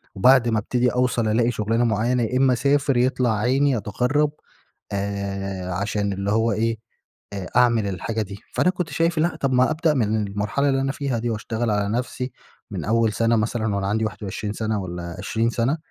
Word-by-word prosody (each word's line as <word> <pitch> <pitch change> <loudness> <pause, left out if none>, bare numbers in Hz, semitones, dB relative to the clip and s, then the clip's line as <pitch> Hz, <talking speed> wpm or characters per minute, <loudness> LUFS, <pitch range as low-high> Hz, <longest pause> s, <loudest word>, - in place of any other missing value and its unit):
وبعد 125 +3 +5
ما 110 - +2
ابتدي 125 +3 +1
أوصل 125 -2 +1
ألاقي 115 +2 +2
شغلانة 115 +1 0
معينة، 120 +3 +1
يا 125 +3 0
إما 130 -1 +4
أسافر 140 +1 +2
يطلع 125 -3 +2
عيني 130 +4 +2
أتغرب، 125 +8 0 0.6
آآ 100 -2 -3
عشان 100 +1 -1
اللي 100 +1 -2
هو 115 +1 +2
إيه، 115 +2 0 0.6
آآ 95 -2 -5
أعمل 115 -4 +4
الحاجة 110 +4 -3
دي. 100 0 -9
فأنا 180 - +3
كنت 180 -3 -2
شايف 165 +3 0
لأ، 170 +3 +1
طب 135 - +1
ما 125 +2 +4
أبدأ 155 0 +2
من 110 -4 +1
المرحلة 105 +8 0
اللي 135 0 +1
أنا 135 - 0
فيها 135 -4 -2
دي، 120 +1 -2
واشتغل 110 +1 -2
على 105 -1 0
نفسي 125 +3 -3 0.4
من - - -4
أول 115 0 +2
سنة 115 +1 +2
مثلًا، 110 -1 0
وأنا 100 -1 -1
عندي 110 +2 0
21 105 0 -4
سنة 110 -2 -2
والّا 85 -2 -6
20 115 +4 0
سنة، 120 +6 0
115 Hz, 185 wpm, -23 LUFS, 105-125 Hz, 0.6 s, وبعد